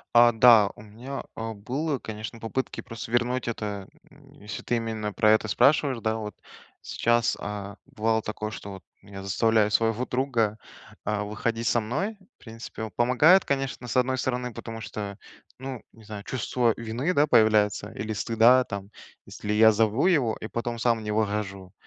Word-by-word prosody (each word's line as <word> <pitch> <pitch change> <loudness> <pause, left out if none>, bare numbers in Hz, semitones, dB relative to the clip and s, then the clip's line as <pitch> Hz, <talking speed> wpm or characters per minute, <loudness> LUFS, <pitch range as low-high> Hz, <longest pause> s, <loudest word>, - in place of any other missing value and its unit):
А, 120 0 +7
да, 110 -3 +6
у - - -13
меня, 120 +6 -7
э, 115 0 -4
было, 135 +8 -2
конечно 110 +1 -7
попытки 120 +4 -3
просто 115 0 -8
вернуть 120 +1 0
это, 105 -4 -4 0.2
э, - - -19 0.2
если 105 +1 -7
ты 120 - 0
именно 110 -2 -3
про 105 +1 +3
это 110 0 +3
спрашиваешь, 135 +4 +3
да, 110 0 -1
вот. 105 -1 -6 0.5
Сейчас, 120 0 +1
а, 100 -1 -6
бывало 110 +1 -1
такое, 105 0 -4
что 100 -1 -8
вот 95 -1 -9 0.2
меня 100 0 -10
заставляю 105 +2 +2
своего 115 +3 +1
друга, 120 -5 0 0.5
а, 105 0 -1
выходить 115 +2 -2
со - - +2
мной. 150 - -3 0.2
В - - -29
принципе, 115 -1 -9
он 110 - -6
помогает, 130 - +5
конечно, 135 -3 -2
с 120 - -4
одной 130 +1 +2
стороны, 125 -1 -2
потому 115 +1 -7
что, 100 -1 -6 0.4
ну, 130 -2 -6
не 115 - -18
знаю, 105 -1 -8
чувство 125 -1 0
вины, 115 +9 -2
да, 145 -1 +4
появляется, 110 -5 +3
или 110 +1 -4
стыда 115 +4 +4
там, 100 -2 -7 0.4
если 105 - -5
я 110 +1 +6
зову 110 +7 +2
его 140 -12 +2
и 110 - -6
потом 120 0 -3
сам 115 -1 +1
не 105 - -3
выхожу, 100 -3 -2
115 Hz, 175 wpm, -26 LUFS, 105-125 Hz, 0.5 s, А